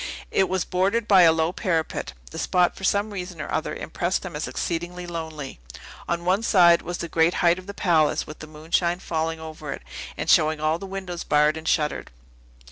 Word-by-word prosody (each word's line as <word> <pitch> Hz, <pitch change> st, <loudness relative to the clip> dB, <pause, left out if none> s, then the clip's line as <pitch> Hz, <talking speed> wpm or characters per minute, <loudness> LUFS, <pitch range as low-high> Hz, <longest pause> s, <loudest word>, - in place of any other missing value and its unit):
It 190 Hz, -, +2 dB
was 185 Hz, -2 st, 0 dB
bordered 200 Hz, +5 st, 0 dB
by 195 Hz, -3 st, +7 dB
a 165 Hz, -2 st, +7 dB
low 160 Hz, +1 st, +1 dB
parapet. 165 Hz, -, -2 dB, 0.2 s
The -, -, -6 dB
spot, 180 Hz, -1 st, +2 dB
for -, -, -11 dB
some 205 Hz, +2 st, +1 dB
reason 180 Hz, -4 st, -6 dB
or 155 Hz, -, -5 dB
other, 160 Hz, -, -2 dB
impressed 175 Hz, +3 st, -2 dB
them 180 Hz, -4 st, -7 dB
as 150 Hz, -, -3 dB
exceedingly 175 Hz, +1 st, -3 dB
lonely. 160 Hz, -, -6 dB, 0.5 s
On 170 Hz, 0 st, -1 dB
one 190 Hz, +4 st, +2 dB
side 175 Hz, -6 st, +5 dB
was 175 Hz, 0 st, -5 dB
the 170 Hz, -, -4 dB
great 165 Hz, +1 st, +2 dB
height 175 Hz, +1 st, +3 dB
of 185 Hz, -, -13 dB
the 200 Hz, -, -6 dB
palace, 160 Hz, -6 st, +2 dB
with 155 Hz, -, -10 dB
the 155 Hz, -, -9 dB
moonshine 165 Hz, +3 st, -1 dB
falling 165 Hz, -2 st, -2 dB
over 155 Hz, -2 st, -7 dB
it, -, -, -10 dB, 0.3 s
and -, -, -3 dB
showing 155 Hz, 0 st, +4 dB
all 155 Hz, +2 st, 0 dB
the 195 Hz, -, -7 dB
windows 190 Hz, -3 st, -5 dB
barred 150 Hz, +1 st, +3 dB
and 160 Hz, 0 st, -7 dB
shuttered. 150 Hz, -2 st, 0 dB
170 Hz, 205 wpm, -24 LUFS, 160-185 Hz, 0.5 s, by